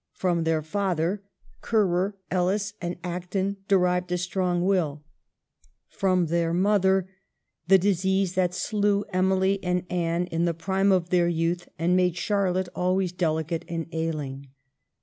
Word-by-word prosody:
From 175 -3 0
their 160 -1 +1
father, 185 +1 -1 0.4
Currer, 200 -3 +1 0.2
Ellis, 195 +3 0
and 175 0 -3
Acton 180 +3 -2
derived 180 -2 +2
a 180 - +1
strong 180 0 -1
will; 160 -7 0 0.9
from 185 -2 +1
their 170 +1 0
mother, 190 -1 +3 0.6
the 195 +1 +7
disease 190 0 +1
that 180 -1 +1
slew 205 0 +1
Emily 190 +1 +2
and 180 0 0
Anne 170 0 0
in 170 -1 -1
the 170 -1 0
prime 190 +4 +1
of 180 -2 +1
their 175 -1 +3
youth 170 +1 -1
and 170 +3 +2
made 180 -1 +2
Charlotte 185 -1 0
always 185 0 0
delicate 160 -2 -1
and 165 -1 -3
ailing. 150 -4 -4
180 Hz, 135 wpm, -26 LUFS, 170-190 Hz, 0.9 s, the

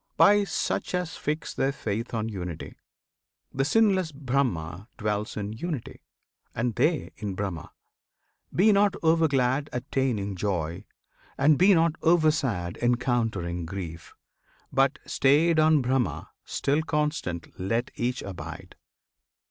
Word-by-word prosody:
By 205 0 +6
such 190 - -2
as 180 -3 -2
fix 155 +2 -3
their 135 - +1
faith 115 -3 -4
on 110 -1 -2
Unity. 90 -6 -6 0.8
The 135 - +1
sinless 190 0 +3
Brahma 120 - -2
dwells 105 -1 -2
in 105 0 -3
Unity, 145 +2 -5 0.5
And 120 +1 0
they 150 +8 +1
in 100 -3 -4
Brahma. 95 -5 -4 0.8
Be 210 +5 +4
not 200 -1 +3
over 165 0 +4
glad 135 +1 +1
Attaining 125 -6 -1
joy, 90 -1 -2 0.5
and 150 +2 +5
be 190 +5 +6
not 165 0 +4
over 160 -2 +5
sad 100 - -2
Encountering 115 -8 0
grief, 85 -3 -7 0.6
but, 135 +2 +3
stayed 155 +4 +3
on 155 -3 +4
Brahma, 130 0 -1
still 145 +3 0
Constant 150 - -2
let 115 +6 -1
each 125 +1 -2
abide! 95 -3 -8
125 Hz, 125 wpm, -27 LUFS, 100-155 Hz, 0.8 s, By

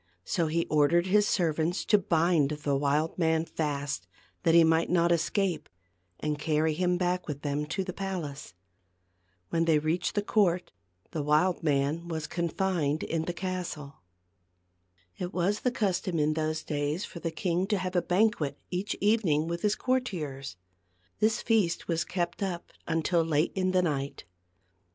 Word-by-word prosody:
I - - -42 0.2
he - - -9
So 170 -2 +2
he 165 +2 0
ordered 155 +3 +3
his 210 +2 +3
ser 170 -7 +2
vants 165 +4 -1
to 210 - +5
bind 165 -4 +2
the 150 -2 -1
wild 145 +5 0
man 160 -1 +2
fast, 145 -3 -3 0.3
that 165 -2 +3
he 170 - +8
might 160 0 +3
not 170 -1 +3
escape, 175 +1 0 0.5
and 150 -1 -2
carry 155 0 +1
him 180 +2 +1
back 180 0 -1
with 145 -2 -5
them 145 0 -1
to 190 +5 -2
the 180 -1 -5
palace. 170 - -5 0.9
When 165 0 +1
they 160 -2 +4
reached 160 +4 -1
the 205 - +1
court, 185 -5 +1 0.4
the 155 - -2
wild 150 +5 +2
man 150 +2 0
was 160 -2 -3
confined 170 -3 -1
in 160 -1 -2
the 175 - -1
castle. 175 - -5 1.2
It 180 0 -4
was 190 +4 +1
the 250 - +1
custom 190 -7 -1
in 150 0 +2
those 155 0 -2
days 150 +4 -2
for 170 - -9
the 165 - -2
king 180 +2 -1
to 210 -1 +1
have 185 0 -3
a 175 - +4
banquet 180 -8 +1
each 185 +3 -2
evening 195 -8 +2
with 170 0 -3
his 210 0 +2
cour 260 0 +1
tiers. 145 - -6 0.6
This 220 +1 +2
feast 210 -7 +1
was 165 -2 0
kept 175 0 -3
up 180 -3 -3 0.2
until 165 +1 +1
late 155 0 +1
in 185 -1 0
the 185 -1 +3
night. 140 -4 -2
170 Hz, 170 wpm, -29 LUFS, 150-185 Hz, 1.2 s, he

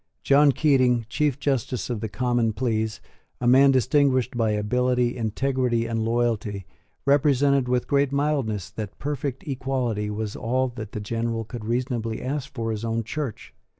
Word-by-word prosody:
John 140 +1 +5
Keating, 130 -5 +3
Chief 145 0 0
Justice 130 -4 -1
of 115 - -2
the 110 0 -4
Common 120 0 0
Pleas, 110 -2 -1 0.4
a 125 - -3
man 135 +3 +6
distinguished 130 -1 +2
by 115 -2 +1
ability, 125 +3 +1
integrity, 120 +1 0
and 115 -1 -1
loyalty, 110 -4 -1 0.4
represented 140 -2 +3
with 125 -1 +1
great 140 -1 +2
mildness 140 - -1
that 105 -3 -6
perfect 145 -2 -4
equality 130 -6 -2
was 105 0 -4
all 130 +3 0
that 110 -3 -8
the 105 - -4
General 115 +1 -2
could 115 0 -7
reasonably 120 -1 -2
ask 140 +1 -4
for 115 -2 -2
his 110 0 -4
own 115 0 -1
Church. 125 +1 -5
120 Hz, 150 wpm, -24 LUFS, 115-135 Hz, 0.4 s, man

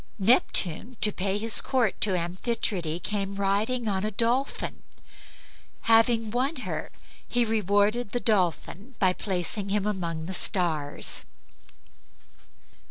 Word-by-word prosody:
Neptune, 215 0 +3
to 210 - +9
pay 195 +1 -2
his 225 +2 +5
court 245 -6 -1
to 195 -4 +3
Amphitrite, 175 -2 -2
came 200 -1 -3
riding 210 +5 -1
on 195 -2 -1
a 215 - -1
dolphin. 235 +6 -1 1.0
Having 225 -1 +2
won 260 +6 -1
her - - -5 0.4
he 245 -1 +1
rewarded 210 +1 0
the 245 - -1
dolphin 205 +2 -1
by 185 -2 +2
placing 195 +1 -2
him 205 0 0
among 170 -6 -3
the 190 - -6
stars. 160 -6 -1
205 Hz, 115 wpm, -26 LUFS, 185-230 Hz, 1.0 s, to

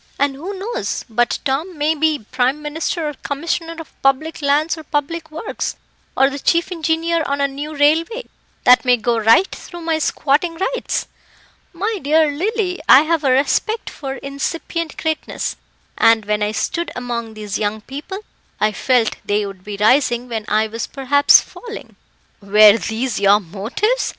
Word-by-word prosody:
And 280 0 +1
who 360 +9 -6
knows 460 +6 -3
but 240 +2 +1
Tom 305 +6 -2
may 300 +2 +2
be 310 -5 0
Prime 255 +3 +1
Minister 305 +2 -3
or 295 - -3
Commissioner 330 +4 -3
of 325 -2 -12
Public 275 +5 +1
Lands 295 +3 +2
or 320 - -9
Public 315 +2 -3
Works, 320 +7 -4 0.4
or 270 +1 +5
the 280 - -5
chief 335 +5 +1
engineer 330 0 0
on 280 0 -1
a 280 - +2
new 290 +3 -6
railway, 330 +11 +2 0.4
that 250 0 +6
may 250 -1 +4
go 230 +1 0
right 225 - +5
through 345 -1 -9
my 325 -1 0
squatting 310 +3 +1
rights? 440 +9 -2 0.7
My 410 +4 -2
dear 305 +1 +3
Lily, 370 +3 -1
I 270 - +9
have 320 0 0
a 270 - +2
respect 285 - +1
for 270 -2 -6
incipient 315 +4 -4
greatness, 315 -1 -3 0.4
and 225 -1 +5
when 210 0 0
I 210 0 +1
stood 340 +9 -2
among 235 -3 -4
these 210 -1 -4
young 215 +1 -2
people, 295 - -7 0.4
I 215 0 +2
felt 235 +2 +1
they 205 0 0
would 195 -2 -9
be 205 0 -6
rising 240 +2 +3
when 225 -3 -4
I 215 +1 +2
was 225 +1 -5
perhaps 285 +1 +5
falling." 460 -2 -10 0.5
"Were 210 +1 +7
these 220 +4 -2
your 200 +1 +5
motives?" 220 - -1
285 Hz, 165 wpm, -19 LUFS, 235-330 Hz, 0.7 s, I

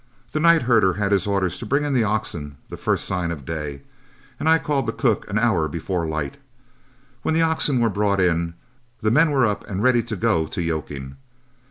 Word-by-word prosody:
The 155 - -1
night 170 -1 +5
herder 110 -6 +4
had 100 0 -1
his 100 -1 +2
orders 95 -3 0
to 120 - -6
bring 140 +5 +1
in 145 -1 -1
the 125 -3 +3
oxen 85 -9 -3
the - - -6
first - - 0
sign 90 -3 -1
of 75 -6 -6
day, 75 -3 -5 0.6
and 160 - +1
I 160 - +6
called 145 -6 -1
the - - +1
cook 115 -6 0
an 100 - -1
hour 110 -9 +2
before 85 +2 -3
light. 75 - -3 0.8
When 160 - 0
the 165 - +3
oxen 160 -5 +1
were 115 -2 +2
brought 100 -1 +1
in, 85 -2 +1 0.5
the 110 - +2
men 155 +6 +5
were 135 -4 +3
up 105 -2 -1
and 100 +1 -2
ready 125 -1 +4
to 115 -1 -5
go 80 -3 +1
to - - -6
yoking. 75 -5 -4
100 Hz, 210 wpm, -22 LUFS, 85-125 Hz, 0.8 s, I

